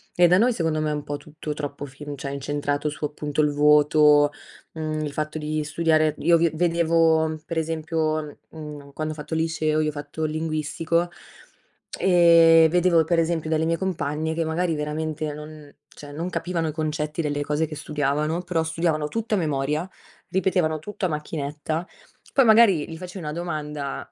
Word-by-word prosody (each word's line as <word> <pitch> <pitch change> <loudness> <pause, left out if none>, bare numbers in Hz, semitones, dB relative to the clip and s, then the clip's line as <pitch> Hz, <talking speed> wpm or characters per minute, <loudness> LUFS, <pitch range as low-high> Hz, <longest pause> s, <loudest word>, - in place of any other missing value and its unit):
e 175 0 +6
da 180 +3 +4
noi, 245 +2 +4
secondo 160 -6 -1
me, 155 - 0
è - - -1
un 150 -1 -4
po' 145 0 -4
tutto 150 0 -7
troppo 145 -1 -5
fim 145 +2 -8
cioè 140 0 -5
incentrato 145 +1 -2
su, 150 0 -4
appunto, 150 0 -2
il 150 -1 +2
voto, 150 0 +5 0.4
mhmm, 155 -1 -3
il 145 - -4
fatto 155 +1 -3
di 155 0 -2
studiare; 155 0 +2
io 170 0 +4
vi 170 0 +3
vedevo, 165 -2 +2
per 165 -1 -2
esempio, 155 -1 -2
mhmm, 150 -3 -10
quando 155 0 -3
ho - - -12
fatto 155 +1 -5
liceo, 160 -1 0
io 155 0 +1
ho - - -3
fatto 145 +2 -6
il 155 - 0
linguistico, 160 +2 -1 0.9
ehm, 165 -3 +6
vedevo 175 -1 +3
per 165 +1 +1
esempio 165 -1 0
dalle 160 0 +1
mie 165 0 +1
compagne 160 -4 -2
che 165 0 -1
magari 165 +1 0
veramente 150 0 -3
non 150 -1 -11 0.2
cioè 145 -2 -12
non 170 +4 -3
capivano 170 -3 -2
i - - -2
concetti 155 0 -2
delle 145 -1 -2
cose 150 +2 -1
che 155 - -7
studiavano, 150 +2 -1
però 170 -2 -1
studiavano 160 -2 -1
tutto 225 +3 -2
a - - +1
memoria, 150 +1 -1 0.4
ripetevano 180 -5 +1
tutto 200 +3 -5
a - - +1
macchinetta, 150 +2 -4 0.5
poi 270 -3 +5
magari 215 -9 +5
gli 160 - -7
facevi 180 0 -8
una 150 - -3
domanda 150 -4 -4
155 Hz, 180 wpm, -24 LUFS, 150-165 Hz, 0.9 s, e